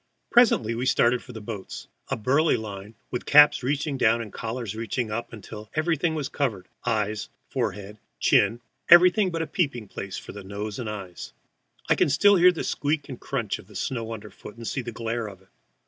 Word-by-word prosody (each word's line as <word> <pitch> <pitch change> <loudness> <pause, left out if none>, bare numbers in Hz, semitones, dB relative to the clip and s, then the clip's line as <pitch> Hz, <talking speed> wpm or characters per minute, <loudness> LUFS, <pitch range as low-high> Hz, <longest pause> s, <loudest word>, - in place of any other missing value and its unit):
Presently 215 - +4
we 120 +3 -2
started 125 -1 +3
for 125 - -12
the 115 - -8
boats. 105 -2 -7 0.2
A - - -2
burly 140 +8 +2
line, 105 0 -8 0.2
with 125 - -4
caps 150 0 +7
reaching 140 +1 -1
down, 115 0 +4
and 110 -3 -7
collars 115 -2 -4
reaching 115 +1 -3
up, 115 +2 -4
until 105 -1 -10
everything 160 0 +1
was 150 -4 -2
covered 110 -12 -2 0.2
ears, 105 -1 -1 0.2
forehead, 105 +1 -3 0.2
chin, 120 +1 +3 0.3
everything 180 +3 +7
but 165 -2 -2
a - - -3
peeping 140 - -2
place 100 0 -6
for - - -8
nose 100 +2 -6
and 115 -4 -4
eyes. 95 -4 -7 0.5
I - - +5
can - - +2
still 205 +8 +5
hear 180 +1 +7
the 170 - -4
squeak 145 0 -1
and 130 - -7
crunch 120 -7 -2
of 100 +1 -11
snow 115 -3 -3
under 105 -2 -7
foot, 105 - -12
and 115 -1 -8
see 135 - -2
the 120 -1 -6
glare 115 0 -3
of 95 -1 -14
it. 95 - -29
115 Hz, 195 wpm, -25 LUFS, 105-140 Hz, 0.5 s, caps